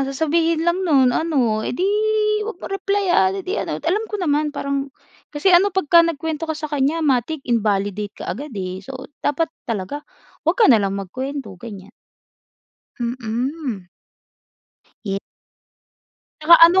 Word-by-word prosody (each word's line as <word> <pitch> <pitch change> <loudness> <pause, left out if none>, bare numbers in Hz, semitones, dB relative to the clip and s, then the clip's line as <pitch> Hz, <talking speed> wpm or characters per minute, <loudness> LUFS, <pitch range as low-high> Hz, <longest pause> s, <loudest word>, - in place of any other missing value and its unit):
sasabihin 320 +3 +1
lang 345 +2 +1
nun 265 -5 +5
ano, 260 -10 +1
"Eh, 245 - -3
di 365 - 0 0.6
'wag 455 - -5
mong 380 - -8
replayan, 390 -1 +2
eh 385 - -5
di 375 - -3
ano," - - -3
alam 415 +6 0
ko 420 - -3
naman 305 -5 +1
parang 280 -1 -3 0.4
kasi 310 +5 +1
ano 355 +3 +6
'pagka 355 -3 +4
nagkuwento 320 -1 -2
ka 315 - -2
sa 305 -1 -5
kanya 295 +3 +1
matic 275 +2 0
invalidate 205 -3 -1
kaagad, 265 +2 -5
eh, 185 -1 -4
so 260 +7 -8 0.2
dapat 320 +3 0 0.2
talaga 225 +6 -3 0.5
'wag 345 - +3
ka 460 - +5
na 230 - +6
lang 195 0 -1
magkuwento 260 +6 -5
ganiyan. 200 -4 -9 1.1
Mm. 240 - -3 1.2
Ye 195 -1 -2 1.2
Tsaka 335 +2 +8
ano 360 +3 +4
290 Hz, 145 wpm, -21 LUFS, 230-335 Hz, 1.2 s, Tsaka